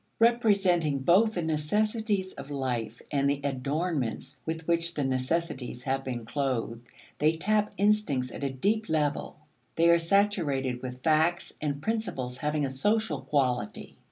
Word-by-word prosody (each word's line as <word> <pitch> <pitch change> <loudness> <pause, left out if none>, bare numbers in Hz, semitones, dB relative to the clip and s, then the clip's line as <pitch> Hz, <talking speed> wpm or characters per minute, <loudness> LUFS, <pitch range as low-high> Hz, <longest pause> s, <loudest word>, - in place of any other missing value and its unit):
Representing 200 - +3
both 210 +9 +4
the 175 - -1
necessities 200 +5 0
of 135 +1 -9
life 120 -5 -3
and 140 -1 +2
the 140 0 0
adornments 140 0 -2
with 160 0 -4
which 170 0 +1
the 145 - 0
necessities 130 -1 -2
have 135 0 -1
been 120 -3 -4
clothed, 120 -3 -2 0.3
they 155 +2 +4
tap 210 +5 +1
instincts 200 -11 +1
at - - -7
a 140 - +1
deep 210 +12 0
level; 150 -2 -1 0.4
they 170 +1 +5
are 170 - +5
saturated 165 -9 +1
with 125 0 -7
facts 160 +3 +2
and 145 -1 -2
principles 170 - -2
having 150 -1 0
a - - -2
social 210 +12 0
quality. 125 -7 -1
150 Hz, 145 wpm, -28 LUFS, 130-185 Hz, 0.4 s, they